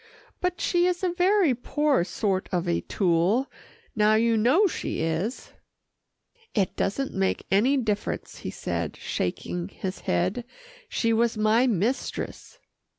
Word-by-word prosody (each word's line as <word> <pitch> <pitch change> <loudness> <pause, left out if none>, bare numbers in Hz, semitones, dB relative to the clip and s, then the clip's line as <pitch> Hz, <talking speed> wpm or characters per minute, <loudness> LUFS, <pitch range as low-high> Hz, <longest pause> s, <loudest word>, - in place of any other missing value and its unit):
"But 360 -1 -1
she 350 0 +2
is 360 +1 -1
a 360 -2 +1
very 365 -4 +3
poor 280 - +1
sort 190 0 -1
of 180 -1 -1
a 170 - +1
tool 185 +7 +1 0.5
now 215 0 +4
you 230 +1 +3
know 255 - +4
she 375 - -2
is." 165 +9 -2 1.0
"It 195 -5 +1
doesn't 265 +8 -1
make 190 0 0
any 240 +9 +4
difference," 210 -5 -2
he - - -5
said, - - -4
shaking 90 0 -3
his 185 - -6
head, 185 - 0 0.5
"she 230 -1 +1
was 230 0 +2
my 220 +4 +3
mistress." 240 - -2
220 Hz, 135 wpm, -26 LUFS, 190-275 Hz, 1.0 s, now